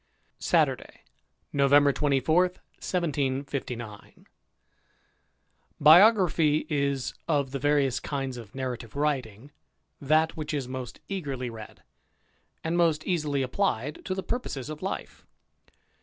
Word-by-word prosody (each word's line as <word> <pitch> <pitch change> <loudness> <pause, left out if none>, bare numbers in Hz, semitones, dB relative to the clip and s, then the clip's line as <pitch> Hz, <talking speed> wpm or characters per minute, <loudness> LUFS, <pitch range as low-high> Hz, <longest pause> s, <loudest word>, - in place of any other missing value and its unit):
Saturday^ - - 0 0.5
November 140 0 +5
24, 145 +5 +2
1759. 135 - -4 1.5
TDIOGRAPHY 165 -2 +6
is, 140 -3 0
of 140 -5 0
the 135 - -3
various 140 -2 +2
kinds 135 -3 -4
of 115 -4 -10
narrati^ve 125 -3 -4
^ - - -24
writing, 135 -4 -2 0.5
that 155 +3 +2
which 155 -1 -4
is 135 -4 -3
most 130 -2 -7
eagerly 140 -10 -4
read, 110 -2 -11 0.8
and 165 +1 -1
most 165 -3 +2
easily 150 -6 0
applied 140 - -1
to 185 - -3
the 190 - -4
purposes 155 - -4
of 155 - -8
life. 190 - -5
145 Hz, 110 wpm, -27 LUFS, 130-160 Hz, 1.5 s, TDIOGRAPHY